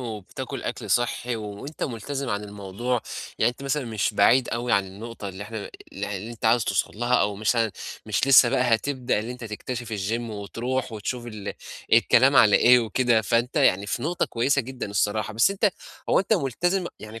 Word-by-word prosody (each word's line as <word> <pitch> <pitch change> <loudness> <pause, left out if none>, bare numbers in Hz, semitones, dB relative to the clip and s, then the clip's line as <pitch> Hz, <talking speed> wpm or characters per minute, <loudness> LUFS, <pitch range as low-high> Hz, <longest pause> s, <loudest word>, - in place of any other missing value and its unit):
وبتاكل 110 -6 -6
أكل - - -5
صحي، 120 0 0
وأنتَ 105 +8 -7
ملتزم 135 +2 -4
عن 100 0 -2
الموضوع، 105 +4 -3 0.4
يعني 115 - +3
أنتَ 125 +3 -13
مثلًا 140 0 -1
مش 110 -2 -1
بعيد 120 +6 +4
أوي 120 +1 -2
عن 100 -1 +3
النقطة 105 +2 -8
اللي 95 +2 -8
إحنا 105 -1 -7 0.2
اللي 100 +1 -4
اللي 110 +5 -7
أنتَ 115 - -11
عايز 110 0 +4
توصل - - -1
لها، 120 +1 +1
أو 105 -4 +2
مثلًا 110 0 +1 0.3
مش 105 +4 0
لسه 130 -3 +8
بقى 125 - +1
هتبدأ 130 -1 -1
اللي 115 +3 -4
أنتَ 125 -1 -9
تكتشف 115 +2 -5
الچيم، 105 +3 -1
وتروح 115 +5 -3
وتشوف 120 +3 -4
ال 105 -3 -6 0.4
الكلام - - +5
على - - +7
إيه 125 +1 +6
وكده، 115 0 +2
فأنتَ 120 +6 0
يعني 100 -8 +3
في 110 +3 -3
نقطة 170 +3 0
كويسة 135 +4 +1
جدًا 125 -4 -6
الصراحة، 105 +1 0
بس 115 - +3
أنتَ 200 +1 +2 0.4
هو - - +4
أنتَ 195 - 0
ملتزم 175 - 0
يعني 110 +1 -9
115 Hz, 185 wpm, -25 LUFS, 105-125 Hz, 0.4 s, لسه